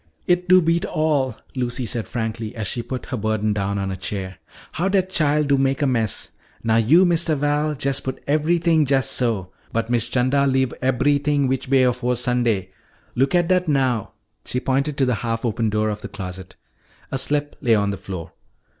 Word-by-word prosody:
"It 180 0 +1
do 185 -1 +7
beat 165 +2 +1
all," 150 - 0 0.2
Lucy 125 -1 -2
said 115 0 -3
frankly 110 -2 -4
as 110 -2 -4
she 120 - -2
put 130 +1 -6
her 130 - -4
burden 110 -1 0
down 100 0 -1
on 95 -1 -2
a - - -3
chair, 95 0 -5 0.3
"how 180 +4 -1
dat 190 -1 +1
chile 150 -3 +2
do 140 -2 +2
mak' 135 +1 +1
a - - +3
mess. 115 -6 -1 0.3
Now 115 -1 +2
yo', 150 +12 +5
Mistuh 170 -2 +2
Val, 150 +1 0
jest 140 0 -1
put 130 - -4
eberythin' 160 +1 +2
jest 135 0 +2
so. 110 -7 0 0.2
But 115 +1 -2
Miss 120 -1 +1
'Chanda 135 +3 +2
leave 130 -1 +1
eberythin' 140 +2 +2
which 130 0 -2
way 135 -1 +4
afore 125 0 +1
Sunday! 120 -6 0 0.4
Looka 140 +8 +3
dat 180 +1 +1
now." 130 -7 0 0.3
She 125 - -1
pointed 140 +3 -1
to 135 - +3
the 125 - +1
half 115 0 -2
open 115 -1 0
door 110 +1 0
of 105 0 -4
the - - -6
closet. 95 -1 -8 0.6
A 135 - -1
slip 145 +2 -1
lay 115 -2 +4
on 100 -1 +1
the - - -3
floor. 95 -3 -7
130 Hz, 190 wpm, -22 LUFS, 110-145 Hz, 0.6 s, do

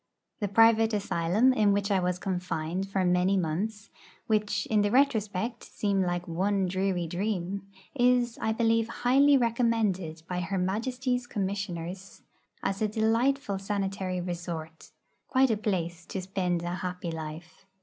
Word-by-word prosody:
The 205 - -1
private 225 +2 +5
asylum 205 +4 +2
in 210 -4 +3
which 200 +1 0
I 195 - +3
was 180 0 0
confined 180 -1 -3
for 195 -1 0
many 180 +2 +3
months, 200 +6 -2 0.3
which 215 -1 0
in 215 -1 +2
the 205 - +2
retrospect 225 -3 +1
seem 200 -2 -1
like 175 -1 -1
one 190 +3 0
dreary 185 -1 0
dream, 195 +2 -3 0.3
is, 245 -2 +2
I 220 - +1
believe, 225 0 +2
highly 270 +4 +4
recommended 225 -9 0
by 180 -1 -2
Her 190 +2 -2
Majesty's 245 +6 -1
Commissioners 195 -3 -4 0.4
as 195 +1 -1
a 215 - +3
delightful 225 +1 +1
sanitary 195 -2 -2
resort 170 -2 -6 0.4
quite 260 -1 +3
a - - +3
place 175 -5 -2
to 190 - -4
spend 180 -2 -1
'a 175 +1 -3
happy 180 -2 -4
life.' 160 +3 -8
195 Hz, 140 wpm, -28 LUFS, 180-220 Hz, 0.4 s, private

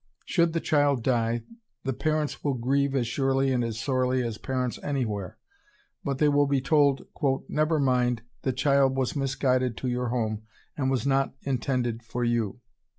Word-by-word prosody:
Should 170 -1 +2
the 165 - +1
child 145 -6 +2
die, 115 -2 +1 0.4
the 135 - -1
parents 155 +2 -1
will 140 -2 +1
grieve 135 +3 +1
as 125 -3 +1
surely 135 +2 +1
and 125 -2 +1
as 115 -1 -3
sorely 130 0 +1
as 115 -3 -4
parents 130 -2 -2
any 140 -3 -1
where; 100 -4 -5 0.7
but... 140 -2 -2
they 150 - +3
will 145 0 +3
be 140 -1 +2
told, 140 0 +3 0.4
"Never 155 +1 +1
mind, 125 -4 +1 0.2
the 130 - 0
child 135 +1 +3
was 130 +1 0
misguided 130 -3 0
to 130 - -3
your 125 0 -1
home, 110 -3 -1 0.3
and 130 -3 0
was 135 -1 0
not 135 -1 +1
intended 125 -3 -1
for 120 +2 -4
you." 120 0 0
130 Hz, 170 wpm, -27 LUFS, 120-140 Hz, 0.7 s, they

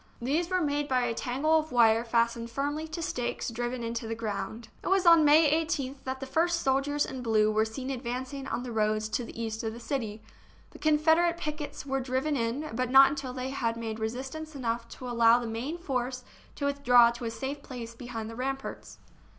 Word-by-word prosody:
These 305 +8 0
were 370 -1 +1
made 290 -1 0
by 255 -3 +2
a 240 -1 0
tangle 280 +7 +1
of 310 0 -6
wire 230 -2 +5
fastened 235 0 0
firmly 290 +5 -2
to 320 +1 -5
stakes 245 -4 -2
driven 240 +1 -3
into 230 0 -3
the 225 - -3
ground. 220 +1 -5
It - - -7
was 385 0 +3
on 335 -2 +8
May 300 +2 +6 0.2
18th 285 -4 -3
that 260 0 -3
the 270 - -5
first 335 +5 +1
soldiers 275 +2 +1
in 260 - -6
blue 215 -2 +3
were 215 +1 +2
seen 260 +4 -5
advancing 260 +2 -4
on 245 - -3
the 250 - -6
roads 215 -1 +1
to 240 - -1
the 230 - -9
east 220 -1 -3
of 220 -1 -2
the 235 - -9
city. 225 -4 -4 0.5
The - - -13
Confederate 320 +3 +3
pickets 300 -3 -5
were 270 -1 -1
driven 260 +3 -1
in, 255 +5 -2
but 255 +1 -1
not 270 +1 +8
until 275 -3 -4
they 255 +1 -4
had 230 -4 -1
made 225 -1 -4
resistance 265 +8 -5
enough 235 -3 -2
to 255 - -8
allow 235 -1 +5
the 245 - -3
main 235 +9 -4
force 255 -5 -3 0.3
to 285 - -3
withdraw 245 -4 +5
to 235 0 -7
a - - -1
safe 265 +6 -5
place 240 -4 -8
behind 230 -2 -6
the 225 - -8
ramparts. 270 +2 -5
255 Hz, 205 wpm, -29 LUFS, 230-290 Hz, 0.5 s, on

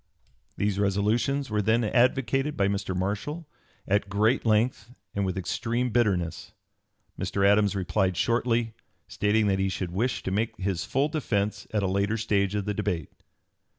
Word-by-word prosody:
] - - -40 0.2
These 100 -1 0
resolutions 110 +7 +1
were 105 0 +1
then 110 +3 +2
advocated 135 +5 +1
by 100 - +3
Mr. 100 -2 -2
Marshall 105 - -3 0.4
at 100 0 +1
great 110 +5 +2
length 110 +3 +1 0.2
and 100 -1 -1
with 95 0 -3
extreme 120 +6 -1
bitterness. 100 -8 0 0.7
Mr. 100 0 +1
Adams 105 0 +3
replied 95 -1 0
shortly, 115 -1 +1 0.3
stating 105 +1 +1
that 95 -1 +1
he 95 0 +1
should 90 -2 -3
wish 115 +8 -1
to - - -3
make 110 +4 -1
his 95 -2 -2
full 140 +3 +1
defence 105 - -1
at 105 -2 0
a - - +1
later 100 +4 0
stage 100 -2 0
of 100 -2 -1
the 105 - -1
debate. 95 -8 -2
105 Hz, 160 wpm, -27 LUFS, 100-115 Hz, 0.7 s, by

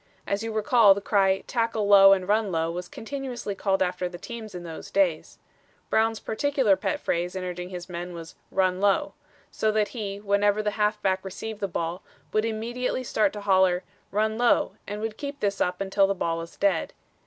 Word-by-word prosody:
As 200 +1 -1
you 225 0 -3
recall, 215 -1 +5
the - - -2
cry, 195 -1 +2
'Tackle 230 -3 -1
low 195 -1 +8
and 190 -2 +3
run 210 -1 +2
low,' 165 -1 0
was 175 +1 -5
continuously 250 -4 -5
called 195 -1 +1
after 180 0 -2
the 175 - -8
teams 220 0 -8
in 175 - -6
those 165 -2 -8
days. 180 -5 0 0.5
Brown's 225 0 +2
particular 260 -3 +1
pet 290 +10 -2
phrase 175 - -2
in 185 - -3
urging 180 0 -5
his 180 -1 -7
men 175 0 -6
was, 165 -1 -9 0.2
'Run 185 -1 +1
low.' 205 +10 +2 0.4
So 220 - +1
that 215 -1 +1
he, 200 -4 -5
whenever 205 +1 +2
the 210 - 0
halfback 210 -3 0
received 205 +3 -6
the 200 - -1
ball, 170 0 -3 0.3
would 215 +1 +2
immediately 240 +3 -2
start 215 -4 +1
to 210 - -6
holler, 190 -2 +3 0.3
'Run 220 +2 0
low,' 240 -1 +3 0.2
and 210 +1 -5
would 220 -1 -4
keep 285 0 -5
this 200 -3 -1
up 180 0 0
until 195 0 +2
the 195 - 0
ball 165 -2 -1
was 165 0 -9
dead. 195 -5 +1
200 Hz, 195 wpm, -26 LUFS, 185-220 Hz, 0.5 s, low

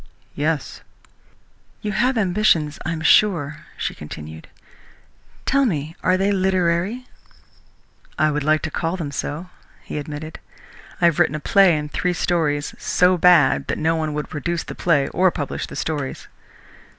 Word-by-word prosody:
"Yes!" 150 0 -2 1.0
"You 210 - -2
have 240 +5 +1
ambitions, 180 -7 +2
I 175 - -2
am 165 -1 -4
sure," 155 -4 +3 0.2
she - - -2
continued. 75 +1 -9 1.0
"Tell 275 +1 +3
me, 160 - -2
are 185 0 +2
they 195 +2 +1
literary?" 185 +4 0 1.1
"I 155 0 +3
would 150 -1 -2
like 155 +1 +2
to 160 - -3
call 165 +4 -2
them 155 -5 -4
so," 150 +5 -5 0.3
he - - -5
admitted. 150 +2 -7 0.6
"I - - +5
have 170 -3 +3
written 150 - +3
a - - -3
play 185 0 +4
and 150 0 -5
three 180 - 0
stories, 160 -4 0
so 180 +1 +3
bad 160 - +4
that - - -2
no 160 +1 +1
one 155 -2 -2
would 150 - -3
produce 165 +3 -3
the - - -7
play 150 -6 +1
or 185 +1 +3
publish 145 -4 -4
the - - -9
stories." 145 -4 -4
165 Hz, 155 wpm, -21 LUFS, 150-185 Hz, 1.1 s, I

